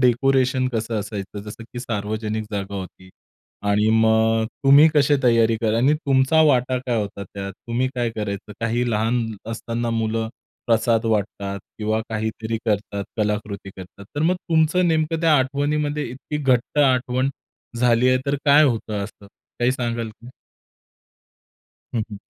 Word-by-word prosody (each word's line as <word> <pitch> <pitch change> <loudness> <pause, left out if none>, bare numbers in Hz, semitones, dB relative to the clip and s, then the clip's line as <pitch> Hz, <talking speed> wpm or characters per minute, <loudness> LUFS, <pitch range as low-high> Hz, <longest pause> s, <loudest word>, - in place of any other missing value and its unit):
Decoration 130 +1 +2
कसं 115 -1 -2
असायचं? 100 -1 -6
जसं 105 +2 -9
की 120 - -6
सार्वजनिक 110 -1 -3
जागा 100 -1 -4
होती 95 -1 -8 0.6
आणि 105 +1 +3
मग 110 0 +3 0.2
तुम्ही 140 +3 +8
कसे 145 0 +4
तयारी 115 -2 +4
करा 110 -1 +1
आणि 135 +5 +4
तुमचा 140 0 +2
वाटा 130 -2 +2
काय 120 -2 +1
होता 100 -1 -5
त्यात? 100 +1 -7
तुम्ही 120 +5 -2
काय 120 -2 0
करायचे? 105 -1 -4
काही 120 +1 0
लहान 115 +2 +1 0.3
असताना 115 +1 -3
मुलं 110 0 -1 0.4
प्रसाद 115 -1 +2
वाटतात 100 -2 -1 0.2
किंवा 110 +1 0
काहीतरी 110 +1 -2
करतात 100 -1 -1
कलाकृती 105 -2 -2
करतात, 95 +1 -11
तर 145 - 0
मग 175 +3 +3
तुमचं 170 +1 +2
नेमकं 160 0 0
त्या 165 -2 +4
आठवणीमध्ये 145 +2 0
इतकी 135 +4 -6
घट्ट 135 -1 +1
आठवण 130 -2 +2 0.5
झाली 120 +1 +3
आहे, 130 0 +4
तर 140 - +1
काय 145 +1 +7
होतं 110 -6 -1
असं, 100 0 -12 0.3
काही 120 +1 +2
सांगाल 120 -3 -2
का? 115 +3 -15 1.7
हं, 115 - +1
हं. 105 - -6
115 Hz, 145 wpm, -22 LUFS, 110-130 Hz, 1.7 s, तुम्ही